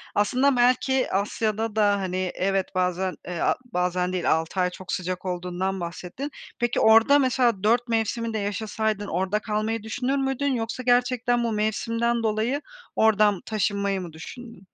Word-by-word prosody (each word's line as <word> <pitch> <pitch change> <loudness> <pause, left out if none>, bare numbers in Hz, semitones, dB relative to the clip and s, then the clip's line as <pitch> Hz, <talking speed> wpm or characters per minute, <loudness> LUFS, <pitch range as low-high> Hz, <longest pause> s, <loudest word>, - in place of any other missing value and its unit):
Aslında 255 +6 +3
belki 255 +2 +2
Asya'da 215 +2 -1
da, 205 -2 +3
hani, 185 -1 -2
evet 195 0 0
bazen 185 0 0
e 175 -2 -5
a - - +2
bazen 180 -3 -1
değil 180 -2 +1
6 160 +4 0
ay 180 - +3
çok 180 0 -9
sıcak 185 0 -3
olduğundan 180 +1 -2
bahsettin. 180 +11 -6 0.3
Peki 240 -1 +1
orada 225 +6 +6
mesela 245 -6 +2
4 235 +3 +3
mevsimi 230 0 -1
de - - -1
yaşasaydın 210 0 -2
orada 190 +4 0
kalmayı 215 +1 -2
düşünür 250 +5 -1
müydün? 270 +1 0
Yoksa 235 +2 -3
gerçekten 245 0 +2
bu 230 - 0
mevsimden 230 +2 0
dolayı 225 +6 0 0.3
oradan 210 -3 +3
taşınmayı 200 -2 -1
mı 170 -3 -8
düşündün? 195 +4 -11
215 Hz, 150 wpm, -25 LUFS, 185-235 Hz, 0.3 s, orada